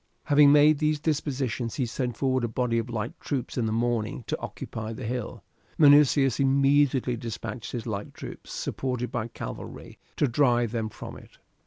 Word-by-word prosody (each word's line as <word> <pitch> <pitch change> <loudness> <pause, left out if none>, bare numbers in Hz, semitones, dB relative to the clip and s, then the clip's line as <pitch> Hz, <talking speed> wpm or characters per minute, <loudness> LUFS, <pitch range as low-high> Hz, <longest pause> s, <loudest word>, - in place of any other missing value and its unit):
Having 145 -1 +6
made 150 0 +6
these 155 -1 +1
dispositions 135 -6 -2
he 130 - 0
sent 120 0 -3
forward 130 -2 +1
a - - +1
body 115 0 0
of 115 +1 -4
light 115 -1 -3
troops 135 -5 -3
in 120 -3 0
the - - -1
morning 115 0 -1
to - - -3
occupy 110 0 -6
the 125 +2 -7
hill. 125 0 -4 0.3
Minucius 145 -3 +5
immediately 135 -2 +3
despatched 115 0 -6
his 120 -3 -4
light 105 -3 -4
troops, - - -9
supported 125 -2 -3
by 115 -2 -2
cavalry, - - -8 0.2
to 145 - +2
drive 120 -3 +2
them 115 -2 -2
from - - -9
it. - - -16
125 Hz, 170 wpm, -27 LUFS, 115-140 Hz, 0.3 s, Having